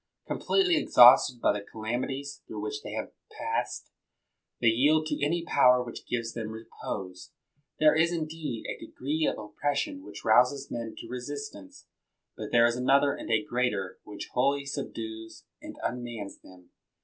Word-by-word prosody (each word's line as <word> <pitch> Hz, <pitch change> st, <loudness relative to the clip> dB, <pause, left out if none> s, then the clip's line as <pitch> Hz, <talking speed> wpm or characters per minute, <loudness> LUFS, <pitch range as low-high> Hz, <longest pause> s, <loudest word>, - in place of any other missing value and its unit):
Completely 370 Hz, -4 st, +2 dB
exhausted 125 Hz, -, +7 dB
by -, -, +3 dB
the 100 Hz, -1 st, -4 dB
calam 110 Hz, +4 st, -3 dB
ities 140 Hz, +1 st, -5 dB
through 110 Hz, -, -6 dB
which 105 Hz, 0 st, -4 dB
they -, -, -7 dB
have -, -, -4 dB, 0.2 s
passed, -, -, -3 dB, 0.7 s
they 120 Hz, -, +4 dB
yield 150 Hz, +7 st, +3 dB
to 155 Hz, -, -2 dB
any 170 Hz, +3 st, 0 dB
power 125 Hz, -5 st, +5 dB
which 120 Hz, -, -9 dB
gives 115 Hz, -2 st, -2 dB
them 110 Hz, -2 st, -4 dB
repose. 100 Hz, -4 st, -7 dB, 0.5 s
There 155 Hz, 0 st, +6 dB
is, 160 Hz, +2 st, +3 dB
indeed, 155 Hz, -7 st, -4 dB
a -, -, -5 dB
degree 150 Hz, +4 st, -2 dB
of -, -, -8 dB
oppression 145 Hz, -, -2 dB
which -, -, -10 dB
rouses 125 Hz, +5 st, +3 dB
men 115 Hz, -2 st, -5 dB
to -, -, -8 dB
resistance; 125 Hz, -5 st, -7 dB, 0.5 s
but -, -, -7 dB
there 120 Hz, 0 st, +6 dB
is 120 Hz, 0 st, +2 dB
another 140 Hz, +3 st, +3 dB
and -, -, -7 dB
a 110 Hz, -2 st, +2 dB
greater, 120 Hz, -7 st, -1 dB
which 105 Hz, -1 st, -8 dB
wholly 140 Hz, +2 st, +1 dB
subdues 110 Hz, -5 st, -6 dB, 0.2 s
and -, -, -9 dB
unmans 120 Hz, -4 st, -5 dB
them. 90 Hz, -1 st, -17 dB
125 Hz, 160 wpm, -28 LUFS, 110-145 Hz, 0.7 s, exhausted